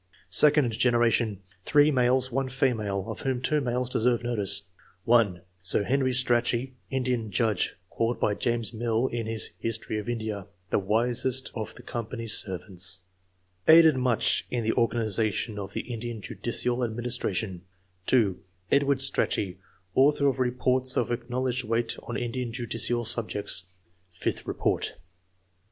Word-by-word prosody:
Second 140 +3 +5
generation. 115 -3 +2
— 95 -2 -33
3 150 0 +4
males, 130 0 +2
1 135 +1 -1
female, 110 -7 0
of 110 - -6
whom 130 -2 -1
2 150 +4 +1
males 125 -1 -1
deserve 120 -1 +1
notice: 100 -4 +1 0.2
— 90 0 -31
(l) 110 -7 +3 0.2
Sir 90 +3 +2
Henry 130 +4 +1
Strachey, 120 0 +3 0.2
Indian 125 -4 -1
judge, 105 -1 0 0.2
called 115 +1 -1
by 105 - +1
James 120 +1 -1
MQl, 115 +1 -1
in 115 -2 -3
his 110 -1 -2
"History 110 -1 -2
of 105 - -6
India," 110 -5 -4 0.2
"the - - +3
wisest 120 +5 0
of 110 -3 -6
the - - -13
Company's 115 -1 -3
servants; 95 -1 -1 0.3
" 90 -1 -41
aided 160 -2 +8
much 125 -3 +1
in 120 -2 -2
the 110 - +1
organi 115 -1 +1
zation 110 0 -1
of 100 0 -7
the - - -2
Indian 120 -1 -6
judicial 120 +4 -2
administration; 110 -5 -2 0.5
(2) 110 -8 +2 0.3
Edward 140 0 +3
Strachey, 100 -8 +1 0.3
author 140 +2 +3
of 130 -2 0
reports 125 +1 +2
of 120 - 0
acknowledged 125 +1 -2
weight 115 +1 -1
on 120 - -5
Indian 120 0 -3
judicial 120 0 0
subjects 105 -4 0 0.5
(Vth - - -3
Report). - - -1
120 Hz, 145 wpm, -27 LUFS, 110-125 Hz, 0.5 s, aided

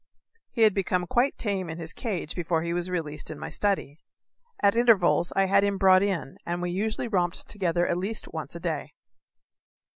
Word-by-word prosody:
He 230 - +1
had 215 -2 +6
become 185 -2 0
quite 250 +7 +1
tame 195 -5 -2
in 160 - -5
his 165 -1 -5
cage 195 - -3
before 165 -2 -1
he 170 0 -2
was 175 +1 -1
released 160 -4 -3
in 155 - -6
my - - -6
study. 190 -8 -1 0.6
At 200 +1 +3
intervals 215 -7 +4
I 195 0 +4
had 200 +1 +4
him 200 -1 +1
brought 190 -1 +6
in, 185 -9 -2
and 175 +1 -3
we 175 0 -2
usually 215 +6 -2
romped 180 -5 -1
together 175 -3 0
at 175 - 0
least 210 +4 -3
once 160 -1 -6
a - - -5
day. 160 -4 -3
180 Hz, 190 wpm, -26 LUFS, 170-200 Hz, 0.6 s, had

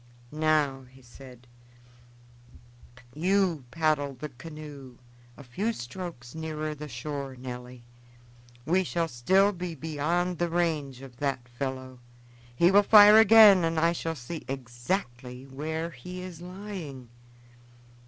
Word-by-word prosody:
"Now," 150 -3 +1
he 130 0 -19
said, 125 0 -14 1.7
"do 150 - -13
you 180 -5 +1
paddle 150 -2 0
the 150 +4 -7
canoe 140 -2 -11 0.4
a 140 - -11
few 190 - -2
strokes 125 - -8
nearer 155 -1 -4
the 150 0 -8
shore, 135 +1 -6
Nelly. 125 -1 -9 0.8
We 185 +3 +2
shall 170 -1 -1
still 190 +10 +3
be 180 -3 -6
beyond 160 +4 -2
the 175 0 0
range 155 -6 -1
of 125 -3 -12
that 135 -3 -2
fellow. 130 0 -6 0.6
He 175 +7 +4
will 200 +1 +7
fire 210 +1 +8
again 215 -4 +8
and 165 -1 0
I 165 +1 +3
shall 165 -1 -3
see 150 +5 -7
exactly 125 0 -4
where 160 +5 -4
he 180 +7 -9
is 175 -3 -9
lying." 180 - -8
150 Hz, 125 wpm, -27 LUFS, 130-175 Hz, 1.7 s, fire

